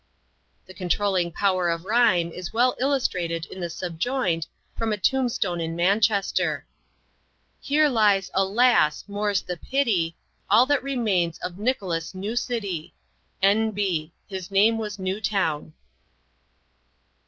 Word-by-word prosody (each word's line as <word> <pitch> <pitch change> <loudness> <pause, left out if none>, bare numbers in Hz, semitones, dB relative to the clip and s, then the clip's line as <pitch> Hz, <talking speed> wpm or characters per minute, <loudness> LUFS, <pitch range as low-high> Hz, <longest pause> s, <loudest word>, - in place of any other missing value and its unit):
The 185 - -13
controlling 185 0 0
power 185 -1 +1
of 170 +1 -2
rhyme 210 -6 +3
is 180 +1 -7
well 245 +2 +2
illustrated 180 -12 0
in 190 - -10
the 175 -1 -3
subjoined, 175 - -2 0.3
from 225 -1 -1
a 210 - 0
tombstone 220 -7 0
in 165 0 -3
Manchester: 200 +3 +1 0.9
"Here 300 +2 +3
lies 210 -7 +2
alas! 195 -5 +3
more's 205 -1 -1
the 180 - -5
pity, 195 -11 0 0.3
All 220 +5 +6
that 285 0 +1
remains 210 -11 0
of 180 +1 -5
Nicholas 195 -9 -2
Newcity. 205 -4 -3 0.5
"N. 215 +3 +4
B. 185 -7 -2 0.2
His 190 -1 -6
name 210 +3 +3
was 210 -1 -4
Newtown." 190 -5 -1
195 Hz, 120 wpm, -24 LUFS, 175-225 Hz, 0.9 s, All